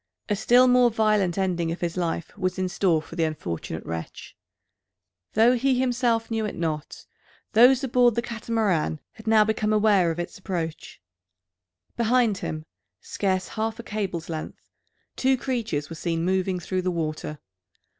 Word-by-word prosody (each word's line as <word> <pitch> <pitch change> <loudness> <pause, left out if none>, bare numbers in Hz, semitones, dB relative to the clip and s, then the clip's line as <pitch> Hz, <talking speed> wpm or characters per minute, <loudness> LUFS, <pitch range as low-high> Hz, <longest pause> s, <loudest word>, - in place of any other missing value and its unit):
A 205 - +2
still 245 +5 +5
more 250 -1 +5
violent 215 -5 +1
ending 175 -4 0
of 170 - -5
his 170 -1 -2
life 170 -2 -3
was 185 -2 -2
in 185 0 0
store 175 -4 +1
for 165 - -11
the 170 - +1
unfortunate 85 - -4
wretch. 80 0 -7 1.0
Though 225 +3 +5
he 255 +1 +1
himself 240 -3 +1
knew 225 -1 0
it 210 - -3
not, 155 -3 -4 0.5
those 245 +4 +6
aboard 245 -2 +3
the 235 - 0
Catamaran 220 -9 -1
had 220 0 -15
now 220 -1 +5
become 215 0 0
aware 205 -5 +4
of 165 - -3
its 175 - -5
approach. 170 -4 -5 1.0
Behind 235 -3 +2
him, 155 0 -5 0.3
scarce 185 -2 -2
half 220 0 -3
a 235 - -8
cable's 195 -7 -4
length, 160 -2 -7 0.4
two 265 0 +2
creatures 230 - -2
were - - -5
seen 165 +1 -2
moving 185 0 0
through 185 +2 -2
the 185 - -1
water. 155 -3 -3
195 Hz, 155 wpm, -25 LUFS, 170-230 Hz, 1.0 s, those